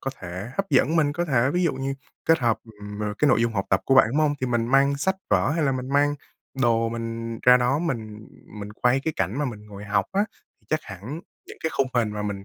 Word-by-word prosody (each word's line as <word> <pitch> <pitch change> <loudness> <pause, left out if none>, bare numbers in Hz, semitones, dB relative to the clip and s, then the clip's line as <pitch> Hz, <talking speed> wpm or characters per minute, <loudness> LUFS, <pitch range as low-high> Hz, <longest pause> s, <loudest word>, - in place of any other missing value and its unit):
có 135 - -3
thể 90 +5 -6
hấp 195 -3 -2
dẫn 145 +4 +3
mình, 145 -2 +3
có 175 +3 -1
thể 130 -4 +2
ví 180 +1 +1
dụ 165 - +2
như 135 +1 -3 0.3
kết 165 +1 +4
hợp, 120 -5 +1 0.2
ừm, 105 0 -7
ờ, 105 -1 -2
cái 150 - +4
nội 110 - +4
dung 115 - +1
học 95 -3 -1
tập 95 - +3
của 135 - +3
bạn, 130 - +7
đúng 135 - -3
hông? 150 -1 +2
Thì 130 - 0
mình 120 -1 0
mang 140 +2 +3
sách 190 +7 0
vở - - +3
hay 160 0 +1
là 135 - +2
mình 130 0 -4
mang 145 +1 +2 0.5
đồ 115 -1 +3
mình 115 0 -4
ra 125 0 +8
đó 125 +4 +1
mình 110 -10 -4 0.3
mình 105 +1 -7
quay 125 +4 +2
cái 160 - 0
cảnh 95 +7 -1
mà 150 - 0
mình 105 -5 -6
ngồi 100 0 -10
học 105 0 +1
á, 200 +2 +2 0.4
chắc 155 0 0
hẳn 110 - -7 0.3
những - - -11
cái 160 - 0
khung 135 - +2
hình 115 -3 +2
mà 105 0 -4
mình 100 -1 -4
125 Hz, 260 wpm, -24 LUFS, 105-145 Hz, 0.5 s, ra